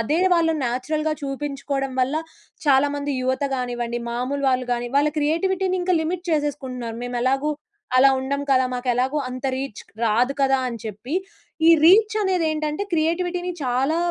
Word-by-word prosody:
అదే 300 +9 +1
వాళ్ళని 325 -2 +2
నేచురల్‌గా 305 +6 -1
చూపించుకోడం 275 -1 -3
వల్ల 260 +3 +1 0.5
చాలామంది 285 +1 +2
యువత 260 +2 0
గానివ్వండి, 240 -1 -3
మామూలు 255 +4 -2
వాళ్ళు 255 -1 0
గానీ, 240 0 -3
వాళ్ళ 290 - +3
క్రియేటివిటీ‌నింక 370 +4 0
లిమిట్ 350 +2 -3
చేసేసుకుంటున్నారు. 260 -6 -2
మేము 245 0 -4
ఎలాగూ 270 +3 +1 0.5
అలా 265 +2 +7
ఉండం 280 +2 -2
కదా! 260 -1 +4
మాకు 250 0 -4
ఎలాగూ 260 +5 0
అంత 255 +1 -7
రీచ్‌ 265 -5 -5 0.2
రాదు 235 +5 +2
కదా! 270 0 +4
అని 235 - -5
చెప్పి. 220 - -6 0.5
ఈ - - +9
రీచ్ 420 +6 +6
అనేదేంటంటే 315 -4 0
క్రియేటివిటీని 350 +2 0
చాలా 260 +5 +1
280 Hz, 140 wpm, -23 LUFS, 255-315 Hz, 0.5 s, ఈ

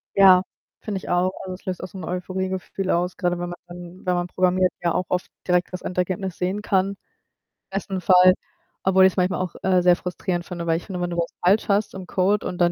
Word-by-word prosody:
Ja, 190 -2 +8 0.4
finde 210 -3 -3
ich 190 - -8
auch. 180 +1 +2
Also, 185 -1 -5
es 185 - -17
löst 185 -1 -4
auch - - -4
so 190 - -11
'n 185 - -7
Euphorie-Gefühl 185 +1 -3
aus, 175 +1 0
grade 175 -2 0
wenn 175 0 -3
man 175 - -5 0.5
wenn 180 -1 +2
man 175 0 -1
programmiert, 185 0 +2
ja 170 -1 +1
auch 180 - 0
oft 180 0 -1 0.2
direkt 180 0 +2
das 185 - -5
Endergebnis 180 0 -2
sehen 185 +3 -1
kann, 195 -1 +1 0.7
besten 195 -1 -3
Fall. 185 0 +7 0.5
Obwohl 190 0 +6
ich's 190 - +3
manchmal 180 -1 +1
auch, 185 -2 -3
äh, 185 -1 +3
sehr 175 0 +5
frustrierend 180 -1 -3
finde, 170 -2 -6
weil 165 - +3
ich - - -8
finde, 185 -3 -5
wenn 175 - -1
du 175 - -4
was 170 0 -1
falsch 195 +5 +3
hast 205 +1 +1
im 190 -1 -7
Code 195 +3 +1
und 180 - -4
dann 175 -1 +4
185 Hz, 225 wpm, -23 LUFS, 180-190 Hz, 0.7 s, Ja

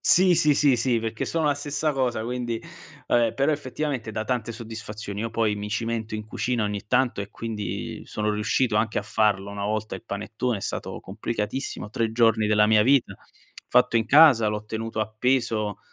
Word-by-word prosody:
Sì, 180 -1 +5
sì, 150 -3 +4
sì, 140 -4 +4
sì, 120 -1 +1
perché 115 0 -3
sono 160 -2 0
la 145 - +3
stessa 145 +1 -1
cosa 125 -5 -1
quindi 120 -1 -3 0.5
ehm, 120 -2 +3
però 140 +3 +2
effettivamente 140 -5 -3
dà 110 - -2
tante 120 -1 -2
soddisfazioni. 110 -3 -7
Io 115 - -3
poi 110 -2 0
mi 105 0 -5
cimento 115 0 -3
in 110 0 -4
cucina 120 +2 -2
ogni 105 -1 -3
tanto 125 -3 +1
e 100 +1 -6
quindi 110 -3 -5
sono 105 0 -2
riuscito 105 +2 +1
anche 110 0 +1
a - - -2
farlo 105 -2 +1
una 100 0 -5
volta 110 +1 -2
il - - -14
panettone, 110 +2 -3
è - - -10
stato - - -4
complicatissimo, 105 +2 -4
3 110 0 -1
giorni 115 -2 +3
della 105 0 +4
mia 105 -1 +5
vita, 135 0 +3 0.6
fatto 115 - +4
in 110 - -1
casa, 140 -6 +7
l'ho 105 0 -2
tenuto 110 +1 -5
appeso 110 -1 0
115 Hz, 185 wpm, -25 LUFS, 105-125 Hz, 0.6 s, casa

